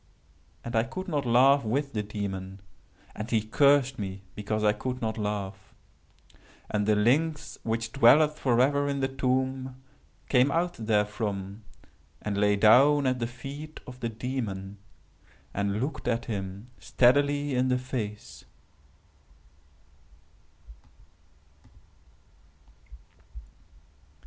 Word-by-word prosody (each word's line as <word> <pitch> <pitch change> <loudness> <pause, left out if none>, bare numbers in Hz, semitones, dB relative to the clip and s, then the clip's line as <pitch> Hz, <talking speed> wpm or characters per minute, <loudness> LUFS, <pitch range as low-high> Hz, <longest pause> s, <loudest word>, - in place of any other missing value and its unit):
And 120 0 -4
I 110 - +4
could 130 - -6
not 145 -7 -2
laugh 130 +3 +5
with 140 +6 -2
the 105 - -1
Demon, 100 -2 -5 0.6
and 110 +2 -6
he 115 - +2
cursed 140 +3 +3
me 95 -1 -5
because 105 +1 -3
I 105 0 +4
could 125 +4 -4
not 110 -2 -2
laugh. 100 -2 -5 1.0
And 105 -1 0
the 105 - +4
lynx 150 +9 +1
which 115 0 -2
dwelleth 150 +5 +5
forever 135 +3 +2
in 140 -1 -2
the 135 - +2
tomb, 130 0 -1 0.5
came 125 +1 +4
out 175 +4 0
therefrom, 105 -2 -2 0.6
and 105 -1 -3
lay 105 0 +3
down 135 +8 +5
at 130 -1 +1
the 115 - -1
feet 140 +5 -9
of 125 0 -11
the 115 - -2
Demon, 110 -5 -5 0.7
and 100 +1 -1
looked 135 +2 -4
at 120 -1 0
him 100 +2 -6
steadily 145 +3 +2
in 125 0 +1
the 125 0 +2
face. 115 -5 -6
120 Hz, 115 wpm, -27 LUFS, 105-135 Hz, 1.0 s, laugh